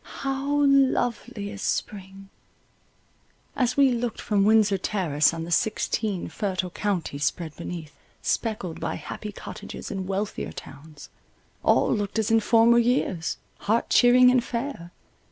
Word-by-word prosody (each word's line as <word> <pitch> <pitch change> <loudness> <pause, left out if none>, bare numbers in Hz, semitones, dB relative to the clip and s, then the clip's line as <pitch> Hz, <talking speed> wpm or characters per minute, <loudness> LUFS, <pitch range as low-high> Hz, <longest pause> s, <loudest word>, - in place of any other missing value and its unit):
How 275 +2 0
lovely 245 -6 +1
is 205 -1 -8
spring! 195 -1 -4 1.3
As 250 0 0
we 275 -2 +5
looked 240 -1 -2
from 200 -2 +1
Windsor 210 -2 +4
Terrace 165 -7 +1
on 165 -1 -5
the 170 - -7
sixteen 210 0 0
fertile 185 -3 -3
counties 175 -8 -2
spread 160 0 -3
beneath, 165 -3 -7 0.3
speckled 210 -7 -2
by - - -3
happy 210 - -7
cottages - - -8
and 190 -2 -4
wealthier 195 +2 -3
towns, 145 +1 -12 0.5
all - - +3
looked 205 -1 -2
as 220 0 0
in 225 - +5
former 230 +2 +5
years, 230 -9 0 0.2
heart 225 +3 0
cheering 250 0 +6
and 250 -2 +3
fair. 235 -8 -5
210 Hz, 135 wpm, -25 LUFS, 180-235 Hz, 1.3 s, cheering